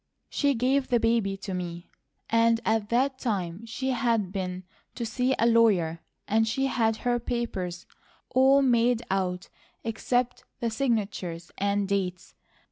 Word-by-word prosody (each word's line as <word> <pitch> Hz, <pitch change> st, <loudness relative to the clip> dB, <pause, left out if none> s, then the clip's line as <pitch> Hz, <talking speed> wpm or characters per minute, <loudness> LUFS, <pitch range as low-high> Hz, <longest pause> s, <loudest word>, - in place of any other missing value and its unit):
She 285 Hz, -2 st, +2 dB
gave 260 Hz, +3 st, +1 dB
the 240 Hz, -2 st, +2 dB
baby 225 Hz, -4 st, +1 dB
to 195 Hz, -1 st, -6 dB
me, 175 Hz, -1 st, -5 dB, 0.4 s
and 230 Hz, 0 st, +3 dB
at 220 Hz, -2 st, +1 dB
that 260 Hz, +2 st, +1 dB
time 200 Hz, -3 st, -3 dB
she 260 Hz, +4 st, -2 dB
had 230 Hz, -6 st, +1 dB
been 185 Hz, -2 st, -4 dB, 0.3 s
to 235 Hz, -, -3 dB
see 250 Hz, +3 st, 0 dB
a 230 Hz, -, +2 dB
lawyer, 205 Hz, -9 st, +3 dB, 0.3 s
and 225 Hz, +1 st, +2 dB
had 230 Hz, -3 st, +1 dB
her 240 Hz, +2 st, 0 dB
papers 195 Hz, -8 st, -3 dB, 0.5 s
all 270 Hz, +2 st, +5 dB
made 240 Hz, -2 st, +3 dB
out 185 Hz, -2 st, -1 dB, 0.3 s
except 245 Hz, +2 st, -1 dB, 0.2 s
the 230 Hz, -1 st, -1 dB
signatures 205 Hz, -8 st, -2 dB
and 200 Hz, 0 st, +1 dB
dates. 185 Hz, -2 st, -2 dB
225 Hz, 135 wpm, -27 LUFS, 195-245 Hz, 0.5 s, all